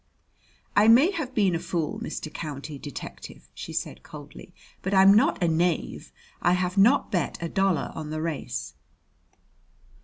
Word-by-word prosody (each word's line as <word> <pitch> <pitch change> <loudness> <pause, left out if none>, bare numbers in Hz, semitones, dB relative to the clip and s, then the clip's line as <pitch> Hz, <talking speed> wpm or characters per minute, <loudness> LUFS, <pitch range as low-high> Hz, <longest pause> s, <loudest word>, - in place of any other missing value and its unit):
"I 205 +2 +5
may 260 - +6
have 300 -9 -5
been 195 -5 +3
a 165 - 0
fool, 170 +3 -3
Mr. 160 -9 -6
County 145 -2 -6
Detective," 140 - -9
she - - -8
said - - -4
coldly; - - -12 0.3
"but 190 +1 -1
I'm 190 +1 +7
not 205 -3 +3
a - - +3
knave. 165 +1 -1 0.3
I 175 - +3
have 180 0 -1
not 230 +8 +4
bet 175 -7 -1
a 170 - -3
dollar 195 0 0
on 155 -2 -6
the 155 0 -3
race." 100 - -4
175 Hz, 155 wpm, -26 LUFS, 155-200 Hz, 0.3 s, I'm